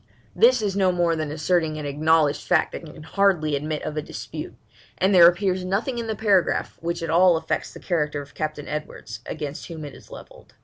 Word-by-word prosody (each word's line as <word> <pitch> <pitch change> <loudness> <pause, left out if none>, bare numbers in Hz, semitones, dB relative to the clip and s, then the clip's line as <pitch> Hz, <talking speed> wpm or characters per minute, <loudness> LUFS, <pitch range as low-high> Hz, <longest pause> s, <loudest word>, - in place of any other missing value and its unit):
This 470 - +5
is 200 -2 -1
no 190 -2 +3
more 175 -2 +1
than 155 -2 -3
asserting 160 0 0
an 150 - -5
acknowledged 150 +1 +2
fact - - +2
that - - -7
can 155 -1 -11
hardly 165 -4 +1
admit 150 +2 -3
of 155 - -4
a - - 0
dispute, - - -7 0.4
and 190 +2 +2
there 175 -2 +9
appears 185 +1 +1
nothing 215 +7 -1
in 230 - -4
the 220 - -2
paragraph 200 -4 +1
which 170 0 -3
at 165 - -2
all 175 0 +5
affects - - -3
the - - -11
character 150 -5 -1
of 140 -1 -10
Captain 155 -1 -4
Edwards, 150 -7 -6
against 150 -2 -5
whom 160 -3 -7
it 145 - -9
is - - -15
levelled. - - -13
165 Hz, 210 wpm, -24 LUFS, 150-185 Hz, 0.4 s, there